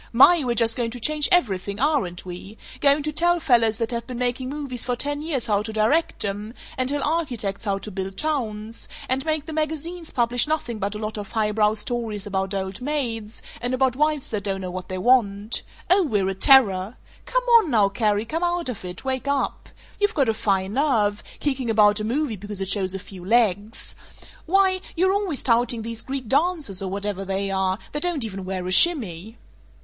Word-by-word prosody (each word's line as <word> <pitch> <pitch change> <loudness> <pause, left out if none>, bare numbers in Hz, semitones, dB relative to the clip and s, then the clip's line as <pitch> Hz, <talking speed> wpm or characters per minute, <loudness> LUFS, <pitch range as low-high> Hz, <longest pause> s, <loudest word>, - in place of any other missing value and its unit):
"My, 300 +7 +6
we're 240 -2 0
just 225 0 +2
going 235 -2 -1
to 245 +2 -8
change 300 +4 0
everything, 200 - +1
aren't 255 - 0
we! 185 +4 -9 0.2
Going 285 +1 +4
to 305 - -2
tell 345 +3 +2
fellows 230 -7 +3
that 230 0 -2
have 235 -1 -4
been 250 -2 -6
making 250 +1 -1
movies 275 -4 -5
for 245 - -1
ten 290 +3 -2
years 300 -6 -2
how 205 -2 +1
to 220 +1 -5
direct 220 +7 +1
'em; 205 +4 -4 0.2
and 255 -1 -1
tell 285 0 -1
architects 245 -12 -2
how 200 -1 0
to 210 +2 -8
build 190 0 -5
towns; 230 -8 -3 0.2
and 260 +1 0
make 310 -2 0
the 315 - -6
magazines 320 +2 -3
publish 240 +1 +1
nothing 275 -8 -2
but 205 +1 -2
a - - -3
lot 215 0 -4
of 205 0 -8
highbrow 210 -1 +2
stories 220 -2 -2
about 195 -1 -2
old 190 +3 -4
maids, 240 -6 -3 0.2
and 245 +1 -1
about 260 -1 +2
wives 300 0 0
that 210 -3 -2
don't 195 -1 -2
know 185 -1 -5
what 185 0 -7
they 185 - -3
want. 210 -1 +2 0.3
Oh, 375 +3 +5
we're 205 - +1
a - - -1
terror!... 200 -2 +4 0.3
Come - - +1 0.2
on 370 - -2
now, 215 -6 +4
Carrie; 210 +1 0
come 325 +9 -3
out 345 -3 0
of 230 -6 -6
it; 180 +6 -8
wake 260 +1 -2
up! 280 -1 -1 0.3
You've 410 +1 +1
got 275 -6 +2
a - - +3
fine 195 -2 0
nerve, 225 -7 +1 0.2
kicking 265 -4 -1
about 210 -1 +4
a - - -3
movie 240 +1 -1
because 205 +1 -7
it 190 -1 -3
shows 195 -2 +1
a - - -1
few 190 -1 -11
legs! 215 0 0 0.5
Why, 380 +1 +3
you're 375 +3 +3
always 395 -8 -1
touting 235 -1 +2
these 230 0 -5
Greek 265 -2 -5
dancers, 290 - +1
or 190 - -3
whatever 200 0 -3
they 195 0 -1
are, 190 -1 0
that 295 - -3
don't 345 -8 0
even 195 -3 -6
wear 185 -1 -4
a 185 - -3
shimmy!" 220 - +3
230 Hz, 205 wpm, -23 LUFS, 205-285 Hz, 0.5 s, My